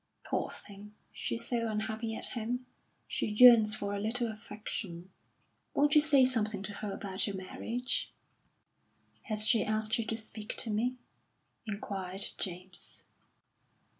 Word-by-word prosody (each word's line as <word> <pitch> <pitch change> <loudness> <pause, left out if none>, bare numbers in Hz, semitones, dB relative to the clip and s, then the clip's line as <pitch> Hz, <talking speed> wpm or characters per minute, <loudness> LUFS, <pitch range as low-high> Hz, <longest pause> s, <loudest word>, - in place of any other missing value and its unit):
Poor - - -1
thing, 205 +1 -8 0.2
she's 235 0 -1
so 235 -2 0
unhappy 220 +1 -2
at - - -3
home; 245 +2 -3 0.4
she - - -1
yearns 220 -1 +8
for 200 -1 -3
a 200 - -2
little 230 +2 0
affection.... 200 -4 -7 0.6
Won't 290 +1 +4
you 300 - +8
say 285 -4 +5
something 215 -5 0
to 205 +1 -5
her 205 0 -5
about 195 0 -2
your 200 - -3
marriage?" 230 +6 -2 1.1
"Has 215 -2 +2
she 225 0 +4
asked 215 +2 +1
you 230 - -1
to 225 - -1
speak 220 -1 -6
to 225 - +4
me?" 245 +4 0 0.7
inquired 195 -2 -2
James. 185 0 -3
215 Hz, 135 wpm, -32 LUFS, 200-235 Hz, 1.1 s, yearns